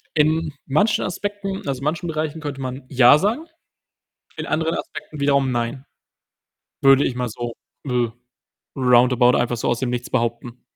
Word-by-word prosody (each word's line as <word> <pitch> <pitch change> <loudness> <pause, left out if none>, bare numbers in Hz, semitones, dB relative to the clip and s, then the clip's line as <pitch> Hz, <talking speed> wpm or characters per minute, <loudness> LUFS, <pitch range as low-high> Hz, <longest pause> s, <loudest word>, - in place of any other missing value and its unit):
In 155 0 +2
manchen 205 +11 +2
Aspekten 195 -1 -4
also, 135 -1 -3
manchen 160 +4 -1
Bereichen 155 0 -3
könnte 145 -3 -5
man 130 +1 -5
„ja“ 130 +2 +6
sagen, 230 - -1 0.9
in - - -4
anderen 160 +1 0
Aspekten 155 - -8
wiederum 140 -2 +2
„nein“, 120 +3 -3 1.0
würde 135 0 +6
ich 125 - -2
mal 125 -1 -2
so, 120 +1 -5 0.3
äh, 125 -3 0 0.7
round 125 -1 +4
about 125 0 +4
einfach 120 0 0
so - - -2
aus 120 - 0
dem 130 - -1
Nichts 125 0 -3
behaupten. 120 0 -2
135 Hz, 155 wpm, -22 LUFS, 125-155 Hz, 1.0 s, ja